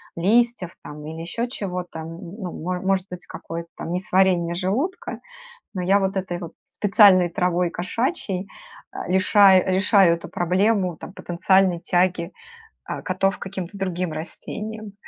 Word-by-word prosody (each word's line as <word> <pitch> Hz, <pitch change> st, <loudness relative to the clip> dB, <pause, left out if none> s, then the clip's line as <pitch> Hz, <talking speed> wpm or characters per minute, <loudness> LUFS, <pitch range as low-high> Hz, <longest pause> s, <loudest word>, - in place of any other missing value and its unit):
листьев 215 Hz, 0 st, +2 dB
там, 150 Hz, 0 st, -9 dB
или 160 Hz, +1 st, -7 dB
еще 230 Hz, +9 st, -3 dB
чего-то, 180 Hz, -7 st, -5 dB
н 160 Hz, -, -6 dB
ну 180 Hz, +2 st, -7 dB
мо 180 Hz, +1 st, -2 dB
может 190 Hz, 0 st, 0 dB
быть 180 Hz, -1 st, -7 dB
какое-то 170 Hz, 0 st, -7 dB
там 165 Hz, -, -6 dB
несварение 180 Hz, -1 st, +2 dB
желудка, 230 Hz, -, -2 dB, 0.5 s
но 185 Hz, -, -3 dB
я 195 Hz, +3 st, +3 dB
вот 195 Hz, +1 st, -1 dB
этой 180 Hz, -2 st, -3 dB
вот 170 Hz, -2 st, -7 dB
специальной 200 Hz, -4 st, +5 dB
травой 180 Hz, -1 st, +1 dB
кошачьей, 195 Hz, -, -2 dB, 0.4 s
а, -, -, -6 dB
лиша 190 Hz, 0 st, +6 dB
решаю 190 Hz, -1 st, +4 dB
эту 170 Hz, -, -9 dB
проблему 185 Hz, 0 st, +1 dB
там -, -, -10 dB
потенциальной 185 Hz, 0 st, +2 dB
тяги, 175 Hz, 0 st, 0 dB, 0.6 s
э, -, -, -4 dB
котов 190 Hz, +1 st, 0 dB
к -, -, -34 dB
каким-то 190 Hz, 0 st, -6 dB
другим 180 Hz, -3 st, -2 dB
растениям. 210 Hz, +6 st, -7 dB
185 Hz, 145 wpm, -23 LUFS, 175-195 Hz, 0.6 s, лиша